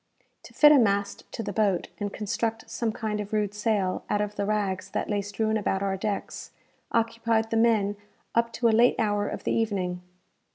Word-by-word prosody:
To - - -13
fit 295 0 +8
a 295 - +7
mast 200 -3 0
to 225 - -4
the - - -4
boat, 200 -5 +1
and 205 -1 -2
construct 225 +2 -3
some 230 -2 -1
kind 215 -1 -3
of 210 0 -5
rude 210 -2 0
sail 210 -3 0
out 205 - +1
of 210 0 -2
the 200 -1 -2
rags 195 -3 -1
that - - -3
lay 205 -1 +1
strewn 215 +2 -1
about 195 -2 -1
our 195 -1 0
decks, 200 +1 -4 0.4
occupied 230 -1 +1
the 225 - +1
men 215 -3 +2 0.4
up 235 0 +2
to 235 - +1
a - - +5
late 235 +2 +5
hour 205 -2 +1
of - - -5
the - - -1
evening. 190 -6 -1
210 Hz, 200 wpm, -27 LUFS, 200-225 Hz, 0.4 s, fit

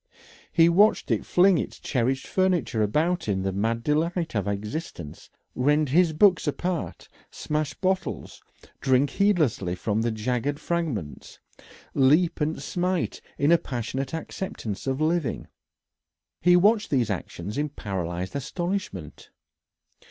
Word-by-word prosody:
He 165 -1 +5
watched 200 +6 +4
it - - 0
fling 185 0 +5
his - - -4
cherished 130 +1 -1
furniture 180 - +1
about 160 - +1
in 95 -2 0
the 95 - 0
mad 115 +4 -1
delight 165 +4 0
of 105 -3 -1
existence, 100 - -5 0.2
rend 150 +3 +2
his 170 +4 +4
books 180 +2 +4
apart, 175 +3 -3 0.2
smash 150 -1 -3
bottles, 190 0 -2 0.4
drink 130 +1 +2
heedlessly 155 - +1
from 105 +4 -1
the 120 - +1
jagged 125 +6 -2
fragments, 145 - -3 0.6
leap 155 +5 +3
and 155 +1 0
smite 180 +2 -1 0.2
in 145 +3 +3
a 170 - +6
passionate 130 +3 -4
acceptance 160 - -5
of 135 +1 -1
living. 160 -4 0 1.0
He 175 0 +5
watched 210 +4 +4
these 120 -6 +1
actions 100 +2 -5
in 150 0 -1
paralysed 95 - -4
astonishment. 170 - -4
145 Hz, 125 wpm, -25 LUFS, 115-175 Hz, 1.0 s, a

